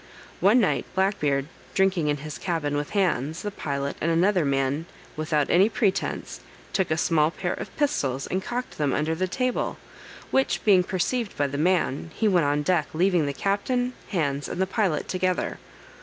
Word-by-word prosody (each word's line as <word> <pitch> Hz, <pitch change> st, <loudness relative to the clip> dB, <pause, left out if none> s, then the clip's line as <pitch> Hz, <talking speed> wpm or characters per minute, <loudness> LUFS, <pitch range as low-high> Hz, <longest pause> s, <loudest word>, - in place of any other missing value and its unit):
One 205 Hz, +7 st, +5 dB
night 210 Hz, -, +1 dB
Black 195 Hz, +2 st, +1 dB
Beard, 140 Hz, -2 st, +1 dB, 0.3 s
drinking 190 Hz, -5 st, +2 dB
in 145 Hz, 0 st, +1 dB
his 150 Hz, +1 st, -7 dB
cabin 160 Hz, -5 st, -1 dB
with 145 Hz, 0 st, -2 dB
Hands, 160 Hz, -6 st, 0 dB
the 205 Hz, -, -4 dB
pilot, 140 Hz, -6 st, -3 dB
and 165 Hz, -, +1 dB
another 180 Hz, +2 st, +3 dB
man, 140 Hz, +3 st, 0 dB, 0.3 s
without 155 Hz, -2 st, 0 dB
any 190 Hz, +5 st, +5 dB
pretence, 210 Hz, -5 st, -1 dB, 0.3 s
took 190 Hz, -3 st, +1 dB
a 155 Hz, -, +1 dB
small 160 Hz, -2 st, +3 dB
pair 175 Hz, +1 st, -3 dB
of -, -, -8 dB
pistols, 140 Hz, -, 0 dB
and 185 Hz, -, -2 dB
cocked 245 Hz, -5 st, -4 dB
them 145 Hz, -3 st, +1 dB
under 155 Hz, +2 st, 0 dB
the 185 Hz, +3 st, -1 dB
table; 255 Hz, +6 st, -1 dB, 0.5 s
which 270 Hz, 0 st, +1 dB
being 195 Hz, -4 st, +6 dB
perceived 200 Hz, +5 st, -2 dB
by 145 Hz, -, +2 dB
the 140 Hz, +1 st, -3 dB
man, 170 Hz, -3 st, +1 dB
he 220 Hz, -, +1 dB
went 175 Hz, -7 st, +3 dB
on 145 Hz, +1 st, +1 dB
deck, 160 Hz, -2 st, +2 dB
leaving 175 Hz, -3 st, +3 dB
the -, -, 0 dB
captain, 245 Hz, -, 0 dB
Hands, 145 Hz, -7 st, -1 dB
and -, -, -5 dB
the 190 Hz, -, +3 dB
pilot 190 Hz, -5 st, 0 dB
together. 185 Hz, -1 st, -1 dB
175 Hz, 180 wpm, -25 LUFS, 145-195 Hz, 0.5 s, being